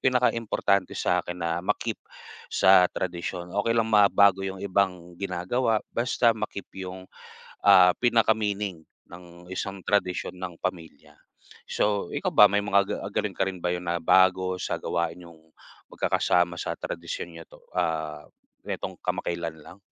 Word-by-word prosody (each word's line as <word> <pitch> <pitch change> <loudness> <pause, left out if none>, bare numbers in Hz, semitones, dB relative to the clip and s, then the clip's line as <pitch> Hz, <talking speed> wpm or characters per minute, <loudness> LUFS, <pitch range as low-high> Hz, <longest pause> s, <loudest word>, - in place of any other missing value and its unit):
pinakaimportante 115 -6 +1
sa'kin 90 +1 -1
na 85 0 -1
ma-keep - - -2 0.5
sa 95 -1 +6
tradisyon. 90 0 -4
Okey 110 +3 +1
lang 115 -1 +2
mabago 100 -2 +5
yung 95 0 -5
ibang 90 -3 -1
ginagawa 100 +5 0
basta 120 0 +2
ma-keep 100 -2 -5 0.2
yung, 95 0 -8 0.6
ah, 90 -1 +7
pinaka-meaning 105 -6 +1 0.3
ng 85 0 -13
isang 95 +1 -4
tradisyon 95 -3 0
ng 90 -1 -6
pamilya. 80 -4 -6 0.5
So, 100 -3 0
ikaw - - -1
ba 105 - +9
may 100 0 +2
mga 100 -1 +3
ga - - -3 0.2
galing - - -1
ka 95 - +2
rin 95 -1 -4
ba 90 - +1
yun 90 0 -5
na 85 - 0
bago 95 +2 +4
sa - - -2
gawain 85 -1 -2
ninyong 85 -2 -16 0.4
magkakasama 90 -1 +1
sa - - -2
tradisyon 85 0 -5
niyo 85 - -9
'to, - - -17 0.2
ah, 80 -3 -1 0.4
netong - - -4
kamakailan 85 -2 -3
lang? 90 - -13
95 Hz, 140 wpm, -26 LUFS, 85-100 Hz, 0.6 s, ba